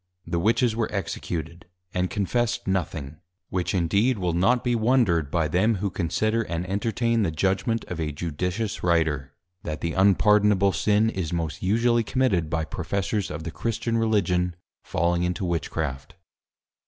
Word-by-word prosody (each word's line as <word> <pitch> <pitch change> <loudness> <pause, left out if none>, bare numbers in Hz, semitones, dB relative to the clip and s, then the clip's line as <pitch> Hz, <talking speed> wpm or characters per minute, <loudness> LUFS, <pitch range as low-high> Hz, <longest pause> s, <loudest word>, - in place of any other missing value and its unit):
The 85 0 -1
Witches 115 +4 +2
were 115 -1 -1
Executed; 85 -3 -4 0.3
and 90 0 0
Confessed 115 +3 -1
nothing; 80 -6 -2 0.3
which 90 0 -1
indeed 100 +8 +2
will 90 -3 -1
not 115 +9 +2
be 125 - +1
wondred 110 - +2
by 80 0 +1
them, 95 +8 +2
who 100 0 -2
Consider 110 +7 0
and 85 -3 -3
Entertain 115 +4 0
the 95 - +1
Judgment 95 +8 0
of 90 - -6
a 80 -2 -1
Judicious 90 +8 -3
Writer, 80 -6 0 0.3
_That 75 -2 -4
the 85 - -2
Unpardonable 100 0 +4
Sin, 105 +1 +2
is 90 -7 -3
most 85 -3 -3
usually 115 +4 +2
Committed 105 -10 +1
by 80 -1 -1
Professors 95 +4 -2
of 75 +1 -5
the 85 - -5
Christian 115 +4 -2
Religion, 90 -6 +1 0.3
falling 85 +1 0
into 90 +2 -1
Witchcraft. 80 -5 -3
95 Hz, 150 wpm, -25 LUFS, 85-110 Hz, 0.3 s, Unpardonable